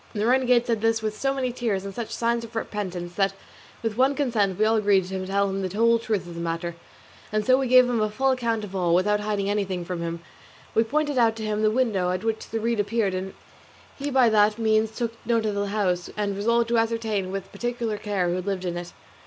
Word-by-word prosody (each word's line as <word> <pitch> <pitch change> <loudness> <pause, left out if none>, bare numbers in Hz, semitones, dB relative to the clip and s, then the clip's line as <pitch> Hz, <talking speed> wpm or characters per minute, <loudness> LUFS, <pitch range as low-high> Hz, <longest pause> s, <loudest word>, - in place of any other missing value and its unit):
The 210 -1 -1
renegade 250 -1 +3
said 230 -4 0
this 225 0 +1
with 215 -1 -2
so 270 +4 0
many 265 -2 -1
tears 220 -6 -2
and 195 - -6
such 235 0 -5
signs 235 0 0
of 230 0 -11
repentance, 185 -6 -4
that 195 0 +1 0.5
with 225 -1 -2
one 265 +2 +3
consent 220 -10 +1
we 215 - +3
all 220 +1 +3
agreed 205 -3 +3
to 185 0 -4
tell 200 +1 +1
him 195 0 -2
the 190 +1 -4
whole 230 +1 +4
truth 215 -4 -2
of 175 - -9
the 170 - -6
matter, 170 +1 -3 0.6
and 215 0 0
so 255 - +6
we 265 - 0
gave 255 0 +7
him 240 -3 0
a 215 - +1
full 265 +5 +1
account 230 -4 -1
of 195 -2 -7
all, 175 -2 +2
without 210 +3 +2
hiding 205 -1 -1
anything 195 -4 -1
from 175 -1 -4
him. 170 0 -3 0.5
We 225 - +4
pointed 290 +3 0
out 225 -2 +4
to 220 -1 -5
him 215 0 -1
the 215 - +4
window 215 -6 +1
at 185 +2 -2
which 225 -1 -2
the 225 - -2
reed 230 0 0
appeared, 205 -1 0
and 185 +1 -4 0.6
he 285 +1 -4
by 260 -3 +4
that 210 0 +4
means 220 -1 +2
took 230 +1 -3
note 230 -1 +1
of 210 - 0
the 200 0 -1
house, 190 -4 -1
and 205 -1 -1
resolved 235 +3 +1
to 235 -1 +3
ascertain 220 -4 -1
with 195 0 -5
particular 240 -3 -3
care 200 -4 -1
who 180 +1 -1
lived 190 -1 -3
in 175 -1 -2
it. 175 0 -7
215 Hz, 240 wpm, -25 LUFS, 195-230 Hz, 0.6 s, gave